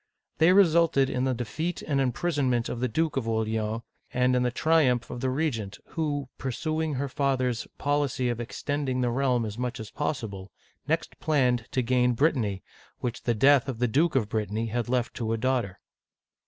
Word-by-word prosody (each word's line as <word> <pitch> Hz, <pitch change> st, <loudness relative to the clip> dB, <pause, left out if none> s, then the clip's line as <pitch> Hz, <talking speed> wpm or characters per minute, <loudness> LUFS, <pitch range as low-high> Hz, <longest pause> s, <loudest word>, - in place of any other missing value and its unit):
They 165 Hz, +3 st, +6 dB
resulted 165 Hz, -7 st, +4 dB
in 125 Hz, +1 st, 0 dB
the 130 Hz, -1 st, +1 dB
defeat 160 Hz, +9 st, -3 dB
and 140 Hz, -3 st, 0 dB
imprison 135 Hz, +2 st, 0 dB
ment 120 Hz, -1 st, 0 dB
of 120 Hz, -, -4 dB
the 125 Hz, -, +1 dB
Duke 155 Hz, +5 st, 0 dB
of 120 Hz, -4 st, -1 dB
Orleans, 110 Hz, 0 st, -1 dB, 0.3 s
and 125 Hz, 0 st, +2 dB
in 125 Hz, -, +2 dB
the 125 Hz, -, +2 dB
triumph 130 Hz, -3 st, +2 dB
of 120 Hz, -, -6 dB
the 130 Hz, -, 0 dB
regent, 120 Hz, -8 st, -2 dB
who, 145 Hz, -4 st, -2 dB
pursuing 155 Hz, +3 st, -2 dB
her 140 Hz, +2 st, -1 dB
father's 130 Hz, -4 st, 0 dB
policy 145 Hz, -3 st, 0 dB
of 120 Hz, -1 st, -1 dB
extending 130 Hz, +2 st, -2 dB
the 120 Hz, -1 st, +1 dB
realm 125 Hz, -2 st, +1 dB
as 105 Hz, +2 st, -6 dB
much 125 Hz, 0 st, -3 dB
as 110 Hz, -1 st, -7 dB
possible, 100 Hz, -9 st, -4 dB, 0.4 s
next -, -, -1 dB
planned 125 Hz, -6 st, +1 dB
to 130 Hz, -, +1 dB
gain 125 Hz, 0 st, +2 dB
Brittany, 115 Hz, -, +1 dB, 0.3 s
which 120 Hz, 0 st, -4 dB
the 120 Hz, -, +2 dB
death 135 Hz, +3 st, +5 dB
of 125 Hz, -, -3 dB
the 125 Hz, +1 st, +1 dB
Duke 150 Hz, +8 st, +2 dB
of 115 Hz, -6 st, +2 dB
Brittany 110 Hz, +1 st, -2 dB
had 120 Hz, +1 st, -2 dB
left 125 Hz, -1 st, 0 dB
to 115 Hz, -2 st, -1 dB
a -, -, 0 dB
daughter. 120 Hz, -6 st, -1 dB
125 Hz, 185 wpm, -27 LUFS, 115-145 Hz, 0.4 s, They